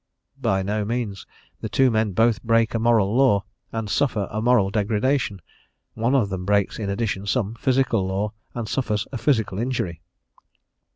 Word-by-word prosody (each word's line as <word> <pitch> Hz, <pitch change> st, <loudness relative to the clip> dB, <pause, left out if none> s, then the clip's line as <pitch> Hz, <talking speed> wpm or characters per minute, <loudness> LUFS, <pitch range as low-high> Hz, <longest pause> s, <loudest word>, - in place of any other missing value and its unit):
By 95 Hz, 0 st, +1 dB
no 105 Hz, +2 st, -1 dB
means: 110 Hz, -3 st, -3 dB, 0.3 s
the -, -, -5 dB
two 130 Hz, -2 st, +3 dB
men 110 Hz, -2 st, +1 dB
both 115 Hz, +2 st, +2 dB
break 115 Hz, -1 st, +2 dB
a 115 Hz, -, 0 dB
moral 110 Hz, -2 st, +3 dB
law, 125 Hz, -7 st, +4 dB, 0.3 s
and 115 Hz, -1 st, -3 dB
suffer 105 Hz, -1 st, 0 dB
a 110 Hz, -, -2 dB
moral 110 Hz, -5 st, +3 dB
degradation; 105 Hz, -, 0 dB, 0.5 s
one 115 Hz, +4 st, +1 dB
of 115 Hz, -7 st, +2 dB
them 95 Hz, -2 st, -4 dB
breaks 100 Hz, +2 st, +1 dB
in 100 Hz, -2 st, -3 dB
addition 100 Hz, -1 st, -2 dB
some 110 Hz, -2 st, 0 dB
physical 120 Hz, -4 st, +1 dB
law, 100 Hz, +3 st, -2 dB, 0.2 s
and 120 Hz, -2 st, -3 dB
suffers 110 Hz, -6 st, -1 dB
a 130 Hz, -, -4 dB
physical 110 Hz, -9 st, +1 dB
injury. 110 Hz, -9 st, -2 dB
110 Hz, 165 wpm, -23 LUFS, 100-120 Hz, 0.5 s, law